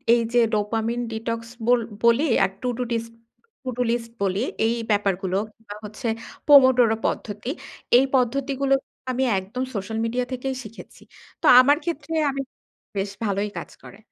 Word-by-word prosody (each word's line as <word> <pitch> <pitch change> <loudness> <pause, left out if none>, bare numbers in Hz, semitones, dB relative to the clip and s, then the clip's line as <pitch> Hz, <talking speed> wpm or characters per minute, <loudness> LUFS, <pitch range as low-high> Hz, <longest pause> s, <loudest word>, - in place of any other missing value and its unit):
এইযে 235 +1 +1
dopamine 225 +3 -1
detox 230 +1 -4 0.2
বল 245 +1 +4 0.2
বলি 235 +4 +5 0.2
আর 195 - +2
Tudu 250 0 -2
disk 230 0 -2 0.5
to do 250 -2 -3
list 230 -1 -3
বলি, 195 0 0 0.3
এই 225 - +2 0.2
ব্যাপারগুলো 195 -2 0 0.2
কিংবা 210 -2 -11
হচ্ছে 210 +4 -6 0.4
pomodoro 260 -5 +7
পদ্ধতি। 210 +3 -3 0.5
এই 260 - +5
পদ্ধতিগুলো 275 +2 +1 0.4
আমি 255 +1 0 0.2
একদম 210 +7 -5
সোশ্যাল 205 +3 -3
মিডিয়া 245 +2 -1
থেকেই 260 +1 -3
শিখেছি। 220 0 -12 0.4
তো - - -3
আমার 285 +3 +5
ক্ষেত্রে 325 -2 -4 0.2
আমি 275 0 -2 0.6
বেশ 195 0 -1
ভালোই 200 0 0
কাজ - - -8
করে। 195 - -13
230 Hz, 140 wpm, -24 LUFS, 210-255 Hz, 0.6 s, pomodoro